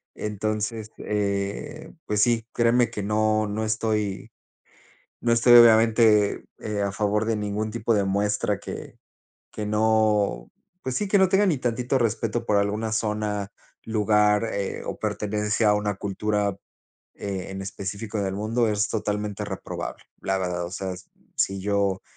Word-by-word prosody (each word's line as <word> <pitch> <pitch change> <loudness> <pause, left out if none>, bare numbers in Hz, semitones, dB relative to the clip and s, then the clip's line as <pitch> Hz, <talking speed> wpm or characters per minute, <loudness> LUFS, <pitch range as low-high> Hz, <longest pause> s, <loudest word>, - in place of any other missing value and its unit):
Entonces, 110 +1 -3
eh, 100 +6 -3
pues 105 0 +1
sí, 115 -1 +2
créeme 120 +1 +3
que 105 - -4
no 110 +1 +1
no 110 +2 -2
estoy 110 -2 -1 0.9
no 120 - 0
estoy, 120 +1 +5
obviamente, 110 -2 +6 0.2
eh, 105 -1 -3
a 100 - 0
favor 105 +2 0
de 115 0 0
ningún 105 +1 -2
tipo 115 0 0
de 100 -2 +2
muestra 100 +1 0
que - - -8 0.6
que 105 - -4
no 105 - +2 0.3
pues 130 -1 -3
sí, 205 - 0
que 200 - +3
no 190 -1 +5
tenga 200 +1 +4
ni 165 -6 +2
tantito 125 +2 -1
respeto 115 0 -1
por 105 -3 +2
alguna 105 +2 -1
zona, 105 -2 -1 0.4
lugar, 105 0 +2
eh, 100 -1 -3
o - - -5
pertenencia 105 +1 0
a - - +4
una 105 0 -1
cultura, 100 0 -1 0.6
eh, 95 -2 -4
en 95 0 -5
específico 100 +2 -5
del 95 -1 -2
mundo, 110 +3 0
es 105 +1 +1
totalmente 105 -2 -2
reprobable. - - -6 0.2
La 95 0 0
verdad, 90 -2 -2
o 85 - -8
sea, 95 -1 -4 0.4
si 95 0 +1
yo 100 -1 0
105 Hz, 150 wpm, -25 LUFS, 100-110 Hz, 0.9 s, obviamente